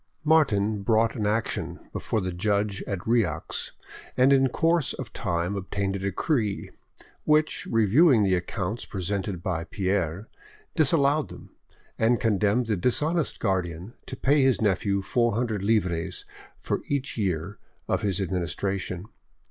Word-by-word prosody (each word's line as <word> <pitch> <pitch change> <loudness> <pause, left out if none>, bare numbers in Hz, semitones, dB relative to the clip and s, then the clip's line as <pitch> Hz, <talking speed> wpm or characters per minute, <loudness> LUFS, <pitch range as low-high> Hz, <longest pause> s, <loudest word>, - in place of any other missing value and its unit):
Martin 110 -10 +3
brought 110 +2 +2
an 105 -4 -1
action 110 +2 -2
before 110 - -1
the 95 0 -2
judge 100 +2 0
at 95 -3 -4
Rieux, 115 -1 0 0.5
and 130 +2 +5
in 135 -1 +4
course 165 +2 +1
of - - -7
time 85 +3 -1
obtained 100 0 -2
a - - -3
decree, 100 - -1 0.5
which, 155 +1 +2
reviewing 115 - +5
the 95 -2 +2
accounts 95 +4 -2
presented 95 -1 -3
by 85 -3 -1
Pierre, 95 0 -2 0.5
disallowed 145 -1 +2
them, - - -12 0.5
and 115 +1 +3
condemned 110 0 +2
the 110 -2 0
dishonest 150 - 0
guardian 95 0 -2
to - - -5
pay 145 +2 +3
his 130 -2 +3
nephew 100 -1 +1
four 120 +3 +1
hundred 110 -4 -1
livres 90 -6 0 0.3
for - - -2
each 140 -2 -2
year 95 -2 -2 0.3
of - - 0
his 100 -2 0
administration. 90 0 -2
105 Hz, 135 wpm, -26 LUFS, 95-125 Hz, 0.5 s, and